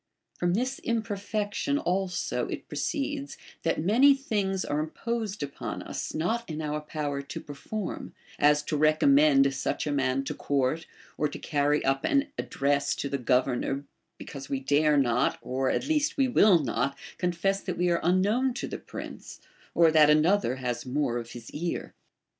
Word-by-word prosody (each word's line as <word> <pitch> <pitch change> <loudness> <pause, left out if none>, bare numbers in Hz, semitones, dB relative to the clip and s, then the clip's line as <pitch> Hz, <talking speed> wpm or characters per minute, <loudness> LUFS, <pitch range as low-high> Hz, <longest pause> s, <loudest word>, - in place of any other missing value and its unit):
From 175 0 +1
this 255 +4 -1
imperfection 215 +3 -1
also 185 -6 -1
it - - -6
proceeds, 285 -1 -3 0.2
that 165 - 0
many 255 +10 +6
things 200 -8 -1
are 145 - -1
imposed 210 +4 -3
upon 140 0 -5
us - - -5
not 220 +10 0
in 155 -1 -4
our 150 -1 -2
power 150 -2 -3
to 140 - -7
perform, 180 +8 -6 0.2
as 150 0 +4
to 155 - -2
recommend 145 -2 +5
such 135 - -2
a 150 - -1
man 135 -1 +1
to - - -4
court, 140 +3 -1 0.3
or 150 - +2
to 145 - -7
carry 145 0 +1
up 135 0 +1
an 280 +1 +2
address 140 0 0
to 140 - -3
the 140 - -2
governor, 125 +2 +1 0.3
because 140 -1 -9
we 135 - -1
dare 145 +2 +3
not, 125 -1 +2
or 130 +1 -1
at - - 0
least 300 -2 +1
we 270 -1 +3
will 210 -6 +6
not, 140 -1 -1 0.2
confess 180 +2 0
that 185 - -4
we 175 0 +2
are 170 - +2
unknown 210 +9 +2
to - - -3
the - - -5
prince - - -9 0.4
or 165 -2 +6
that 155 -1 +6
another 155 -2 +3
has 125 -2 -3
more 130 -2 -1
of 115 -1 -8
his 120 -2 -10
ear. 170 +3 -4
155 Hz, 165 wpm, -28 LUFS, 140-205 Hz, 0.4 s, many